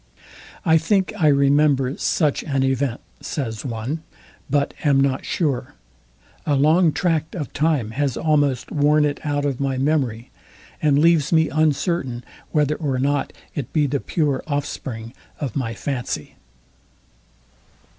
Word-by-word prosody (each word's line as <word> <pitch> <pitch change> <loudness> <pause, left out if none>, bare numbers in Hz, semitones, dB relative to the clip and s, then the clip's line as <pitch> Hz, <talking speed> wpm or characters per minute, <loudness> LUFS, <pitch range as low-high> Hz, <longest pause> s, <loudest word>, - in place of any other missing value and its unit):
I 160 -1 +5
think, 190 +4 +1
I 160 - +2
remember 140 -1 +3
such 150 -5 +1
an 135 -3 0
event, 135 -2 0 0.2
says 115 -7 -4
one; 125 +5 -4 0.5
but 140 +1 +1
am 140 -3 +4
not 135 -1 +1
sure. 140 -4 -1 0.7
A 145 - +1
long 155 +4 +4
tract 160 -2 -1
of 150 -7 -5
time 145 -8 +1
has 140 +1 -1
almost 145 -5 +1
worn 150 0 +3
it 145 -1 -1
out 145 -1 -1
of 135 -3 -1
my 135 -1 -1
memory, 130 -5 0 0.5
and 145 -2 +3
leaves 160 -1 +4
me 160 -1 +4
uncertain 150 -4 0 0.3
whether 150 0 +1
or 140 -5 -1
not 140 +2 0 0.2
it 140 -5 -5
be 150 -2 +3
the 140 0 -1
pure 145 -4 0
offspring 130 -5 -4 0.3
of 135 -6 -4
my 115 -4 -2
fancy. 125 +4 -4
145 Hz, 135 wpm, -22 LUFS, 130-155 Hz, 0.7 s, I